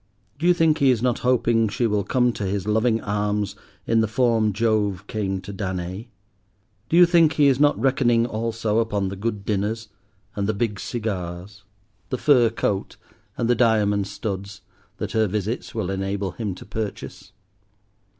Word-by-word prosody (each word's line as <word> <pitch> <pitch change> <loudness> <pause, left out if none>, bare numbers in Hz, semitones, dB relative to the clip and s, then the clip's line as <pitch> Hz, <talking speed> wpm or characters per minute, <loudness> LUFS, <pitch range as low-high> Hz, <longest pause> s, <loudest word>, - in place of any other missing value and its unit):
—do 170 - +1
you 180 - +6
think 160 -2 +3
he 140 - +4
is 120 -2 +2
not 125 -2 +1
hoping 120 -3 +2
she 115 +4 -1
will 105 -2 +1
come 125 +1 +1
to 105 - -5
his 95 -1 -2
loving 110 +2 +2
arms 105 0 -1 0.3
in 115 -1 +3
the 110 - +1
form 115 -1 +2
Jove 105 -3 0
came 100 -3 -2
to 100 +2 -8
Danae? 95 +2 -4 0.8
Do 165 - +3
you 180 - +9
think 170 -2 +4
he 150 - +3
is 135 -2 +4
not 145 0 +3
reckoning 125 -3 +2
also 115 -1 -1
upon 105 -4 0
the 100 - -5
good 105 0 -4
dinners 105 +2 -2 0.5
and 100 -1 -1
the 110 - 0
big 105 -2 -2
cigars, 100 -3 -5 0.4
the 130 - -2
fur 125 -4 +4
coat 100 -3 -2 0.4
and 115 - 0
the 120 - +4
diamond 105 -4 +2
studs, 100 -2 -5 0.4
that - - -4
her 110 -1 +2
visits 105 +5 -3
will 100 -4 -2
enable 95 0 -2
him 100 -1 -4
to - - -12
purchase? 105 -2 -6
110 Hz, 170 wpm, -23 LUFS, 100-120 Hz, 0.8 s, you